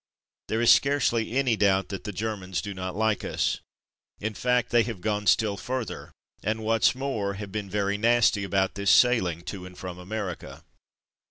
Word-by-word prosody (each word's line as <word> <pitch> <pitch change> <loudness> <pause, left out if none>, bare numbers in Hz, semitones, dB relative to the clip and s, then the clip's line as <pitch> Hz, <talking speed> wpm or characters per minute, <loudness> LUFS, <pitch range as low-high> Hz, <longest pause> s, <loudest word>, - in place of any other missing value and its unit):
There 110 +1 -1
is 120 - +6
scarcely 125 -4 +1
any 130 -4 +2
doubt 95 -2 +2
that 95 0 -6
the 105 - -3
Ger 110 +3 -2
mans 95 -2 -4
do 100 - -5
not 95 -1 -5
like 110 0 +1
us. - - -1 0.6
In 110 +1 -3
fact, 125 +2 0
they 120 0 +5
have 115 -4 -4
gone 105 +1 -2
still 105 -3 +3
further, 125 +5 -5 0.3
and 110 +1 -2
what's 115 +2 +3
more 110 -7 -2
have 100 -1 -7
been 105 -1 -4
very 100 0 -1
nasty 115 -3 +3
about 95 0 0
this 100 0 -1
sailing 95 -10 +4
to 90 0 -6
and 90 - -14
from 90 -1 -7
America. 95 -1 -6
105 Hz, 180 wpm, -26 LUFS, 95-115 Hz, 0.6 s, is